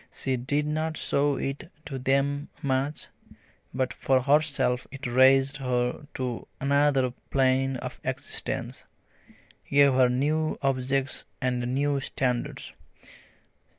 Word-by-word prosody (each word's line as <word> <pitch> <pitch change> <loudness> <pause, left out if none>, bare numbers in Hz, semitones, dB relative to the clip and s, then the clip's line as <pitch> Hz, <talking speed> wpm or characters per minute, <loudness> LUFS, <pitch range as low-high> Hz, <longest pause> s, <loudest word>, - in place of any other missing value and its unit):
She 135 -1 -1
did 145 +4 0
not 155 +1 -2
show 145 0 +1
it 140 +6 -4
to 135 -3 -5
them 140 +3 0
much, 140 +2 -1 0.6
but 130 -1 -1
for 130 -1 +2
herself 140 -3 +2
it 135 0 -8
raised 135 +3 +4
her 125 +1 -1
to 125 -3 -4
another 140 -2 +2 0.2
plane 135 0 +2
of - - -7
existence, - - -4 0.9
gave 140 -1 +5
her 130 -1 +4
new 150 +5 0
objects 135 0 0
and 125 -1 -1
new 140 0 +1
standards. 125 -2 -2
135 Hz, 115 wpm, -27 LUFS, 130-145 Hz, 0.9 s, gave